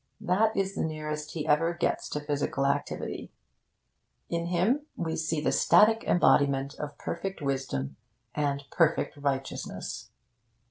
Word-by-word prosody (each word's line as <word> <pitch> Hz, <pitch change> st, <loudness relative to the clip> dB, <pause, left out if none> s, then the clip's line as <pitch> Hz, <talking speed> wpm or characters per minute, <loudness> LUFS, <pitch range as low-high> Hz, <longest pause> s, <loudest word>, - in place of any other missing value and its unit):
That 215 Hz, +5 st, +2 dB
is 195 Hz, 0 st, 0 dB
the -, -, -2 dB
nearest 150 Hz, -1 st, -4 dB
he 155 Hz, -3 st, -3 dB
ever 165 Hz, +3 st, +2 dB
gets -, -, -1 dB
to 150 Hz, -, -2 dB
physical 145 Hz, -2 st, -1 dB
activity. 140 Hz, -, -2 dB, 1.0 s
In 170 Hz, 0 st, -1 dB
him 215 Hz, -, +1 dB
we 160 Hz, -1 st, -2 dB
see 160 Hz, 0 st, -1 dB
the 150 Hz, -, +1 dB
static 225 Hz, +2 st, +5 dB
embodiment 140 Hz, -5 st, +3 dB
of 150 Hz, -1 st, -5 dB
perfect 195 Hz, 0 st, -4 dB
wisdom 130 Hz, -, -2 dB, 0.4 s
and 140 Hz, -1 st, -1 dB
perfect 165 Hz, -2 st, +2 dB
righteousness. 140 Hz, -2 st, -3 dB
150 Hz, 130 wpm, -28 LUFS, 140-175 Hz, 1.0 s, static